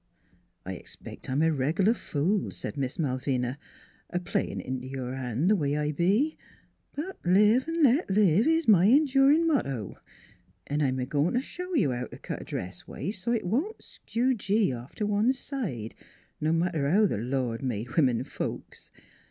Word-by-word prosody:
" 90 0 -41
I 95 - -4
expect 90 - -10
I'm 135 +4 +1
a 160 - +4
reg'lar 160 - +2
fool," 170 - -1
said 95 +3 -6
Miss 135 -2 -3
Mal 130 -5 -1
vina, 130 0 -2 0.3
" - - -32
a 175 - -1
playin' 175 - -2
int' 130 -1 -4
your 130 -1 -5
hand 130 +4 -1
the 210 - +5
way 145 -5 0
I 150 0 0
be; 200 - +1 0.6
but 355 +7 -6
live 210 +8 +4
V 330 0 -2
let 275 +5 +4
live 200 - +4
is 325 0 +2
my 195 -3 +6
endurin' 280 +4 +5
motto, 140 - -1 0.7
an' 145 +1 -1
I'm 130 -2 +1
a 125 - -1
goin' 145 - 0
t' 250 - +2
show 360 +5 -6
you 190 - +3
how 125 0 -3
t' - - -11
cut - - -6
a - - -9
dress 90 +1 -6
waist 190 +6 -4
so 235 - -1
't - - +3
it - - -10
won't 280 - -1
skew 250 +3 -1
gee 205 - +1
off 120 +2 -9
t' - - -3
one 210 +4 +2
side, 205 - -4 0.5
no 155 +1 +1
matter 165 -4 +1
how 210 +6 +4
th' 185 - 0
Lord 120 -1 -2
made 120 -2 -3
women 130 -7 +3
folks. - - -6
165 Hz, 190 wpm, -28 LUFS, -, 0.7 s, my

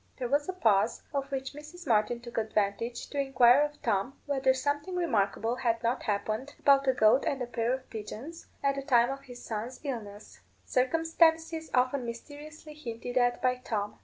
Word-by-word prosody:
There 250 - -2
was 290 +5 +1
a - - -1
pause, 225 - +2
of 275 -1 -2
which 270 0 -3
Mrs. 305 +4 -11
Martin 235 -1 +2
took 235 -1 -4
advantage 220 +2 -1
to 285 - -2
inquire 265 -1 +5
of 295 0 -2
Tom 225 +4 -1
whether 270 -2 +2
something 290 +6 -2
remarkable 230 - 0
had 230 -2 0
not 235 +2 0
happened 215 +6 -2
about 275 -1 +4
a 260 - +5
goat 220 +2 +4
and 275 - 0
a 250 - -2
pair 235 -1 -1
of 260 0 -3
pigeons, 235 +9 -8 0.2
at 275 0 +3
the 275 - -4
time 245 -3 +3
of 275 0 -6
his 245 -1 -11
son's 230 +3 -5
illness 215 -7 -6 0.3
circumstances 325 +3 +2
often 255 +1 +2
mysteriously 295 +6 -9
hinted 245 -4 -7
at 245 0 +2
by 250 0 +2
Tom. 210 -5 -4
255 Hz, 180 wpm, -29 LUFS, 230-285 Hz, 0.3 s, inquire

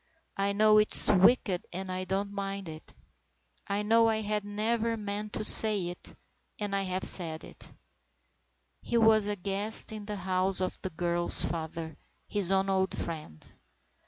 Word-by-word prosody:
I 200 0 -1
know 215 +1 +4
it's 210 - +6
wicked 190 -1 +3
and 185 +1 -6
I 185 0 -4
don't 195 +2 -3
mind 195 -1 -5
it. 155 0 -9 0.7
I 200 +1 -2
know 225 +2 +3
I 220 0 -1
had 210 0 -2
never 225 +3 -2
meant 210 0 -5
to - - -1
say 210 -4 +5
it, 175 - -5 0.4
and 205 -1 -3
I 195 - 0
have 185 -1 -4
said 160 -3 +1
it." - - -11 1.1
He 235 - -2
was 220 -2 +4
a 210 - -2
guest 200 +4 -3
in 210 -1 -8
the 210 - -4
house 185 0 +2
of 185 - -2
the 190 - -4
girl's 175 0 +1
father, 160 -1 -6 0.3
his 200 -4 -1
own 195 0 +1
old 190 -1 -1
friend. 155 - -6
195 Hz, 160 wpm, -28 LUFS, 185-210 Hz, 1.1 s, it's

